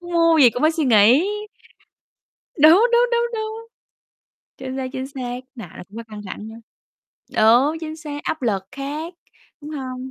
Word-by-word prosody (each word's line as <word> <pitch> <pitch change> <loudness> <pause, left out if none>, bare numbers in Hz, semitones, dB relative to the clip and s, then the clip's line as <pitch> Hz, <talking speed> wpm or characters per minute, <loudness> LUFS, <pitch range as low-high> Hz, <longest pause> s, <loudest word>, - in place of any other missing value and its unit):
muốn 350 0 -9
mua 335 -1 +4
gì 245 - +7
cũng 245 - -5
phải 315 - +4
suy 320 -2 -1
nghĩ. 235 - +5 1.4
Đúng, 330 +9 +7
đúng, 480 +1 +3
đúng, 475 0 +1
đúng. 440 +1 -5 0.9
Chính 260 0 -6
xác, 260 -1 -3
chính 260 -1 -4
xác, 250 -3 -6
nào 225 -8 -9
nó - - -9
cũng 205 - -14
có 230 - -5
căng 210 -1 -8
thẳng 210 +3 -8
đó 225 - -11 0.8
đúng, 250 +9 +4
chính 315 -1 -6
xác, 295 -2 -7
áp 315 - -3
lực 200 -5 -1
khác, 295 +5 -6 0.5
đúng 295 +1 -9
hông? 260 -3 -6
280 Hz, 180 wpm, -21 LUFS, 245-325 Hz, 1.4 s, gì